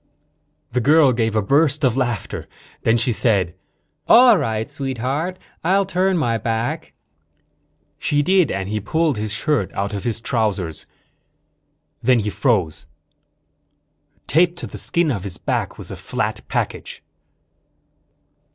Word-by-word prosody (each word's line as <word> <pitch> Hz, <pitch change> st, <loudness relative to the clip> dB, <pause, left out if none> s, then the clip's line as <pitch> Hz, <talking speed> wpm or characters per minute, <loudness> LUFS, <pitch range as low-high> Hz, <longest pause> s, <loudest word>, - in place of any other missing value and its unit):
The 125 Hz, +1 st, 0 dB
girl 145 Hz, 0 st, +5 dB
gave 115 Hz, -2 st, 0 dB
a 110 Hz, -, +2 dB
burst 150 Hz, +5 st, +2 dB
of 125 Hz, -3 st, +3 dB
laughter. 120 Hz, -6 st, -2 dB, 0.3 s
Then 115 Hz, +1 st, +3 dB
she 120 Hz, +1 st, +2 dB
said: 100 Hz, -7 st, +1 dB, 0.5 s
"All 245 Hz, -1 st, +8 dB
right, 110 Hz, -, -1 dB
Sweetheart. 140 Hz, +5 st, -3 dB, 0.3 s
I'll 195 Hz, +4 st, +3 dB
turn 185 Hz, 0 st, +1 dB
my 115 Hz, -8 st, 0 dB
back." 115 Hz, +2 st, -3 dB, 1.1 s
She 145 Hz, 0 st, +1 dB
did, 185 Hz, -1 st, +3 dB
and 95 Hz, -1 st, -3 dB
he 105 Hz, +1 st, -2 dB
pulled 155 Hz, +5 st, 0 dB
his 105 Hz, 0 st, -3 dB
shirt 120 Hz, -, 0 dB
out 100 Hz, +1 st, -2 dB
of 100 Hz, -2 st, -4 dB
his 115 Hz, -1 st, -1 dB
trousers. 105 Hz, -, -1 dB, 1.1 s
Then 125 Hz, +1 st, +4 dB
he 105 Hz, -2 st, -1 dB
froze. 95 Hz, -, 0 dB, 1.4 s
Taped 170 Hz, +3 st, +3 dB
to -, -, -4 dB
the -, -, -8 dB
skin 170 Hz, -3 st, +1 dB
of 100 Hz, -7 st, -3 dB
his 100 Hz, -3 st, -2 dB
back -, -, -2 dB
was -, -, -7 dB
a -, -, -5 dB
flat -, -, -3 dB
package. -, -, -4 dB
120 Hz, 135 wpm, -21 LUFS, 105-155 Hz, 1.4 s, All